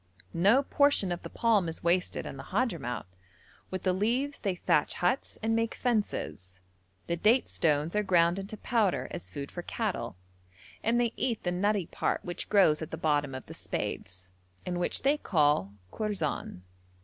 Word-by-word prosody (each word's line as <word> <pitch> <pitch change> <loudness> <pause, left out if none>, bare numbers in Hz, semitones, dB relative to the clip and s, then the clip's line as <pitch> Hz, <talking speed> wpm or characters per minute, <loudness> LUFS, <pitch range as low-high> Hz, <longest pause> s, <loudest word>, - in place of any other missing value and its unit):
No 205 +11 +4
portion 280 -10 +3
of 175 - -3
the - - -7
palm 215 -7 +2
is 165 - -6
wasted 175 +2 +1
in - - -6
the - - -9
Hadhramout: 175 - -1 0.6
with 185 - -4
the 185 - +2
leaves 245 +9 0
they 195 -4 -1
thatch 150 -4 +1
huts 180 +10 0
and 225 0 +2
make 230 0 0
fences, 200 - -2 0.5
the 170 - -1
date 225 +9 +3
stones 155 +2 +1
are 210 - +3
ground 175 -2 +3
into 200 +3 -6
powder 200 - +1
as 90 - -6
food 140 +9 -6
for 175 - -5
cattle, 210 - -3 0.7
and 235 +2 +2
they 235 -1 +1
eat 235 -4 -1
the 175 - 0
nutty 200 +1 +1
part - - -2
which 175 -1 -4
grows 185 -7 +5
at 160 - -5
the 160 - -5
bottom 145 -4 +1
of 130 - -7
the - - -9
spathes, 95 -1 -4 0.4
and 175 -1 -2
which 175 - -1
they 280 +3 +4
called 150 - +2 0.2
kourzan. 190 - -2
185 Hz, 175 wpm, -29 LUFS, 155-220 Hz, 0.7 s, grows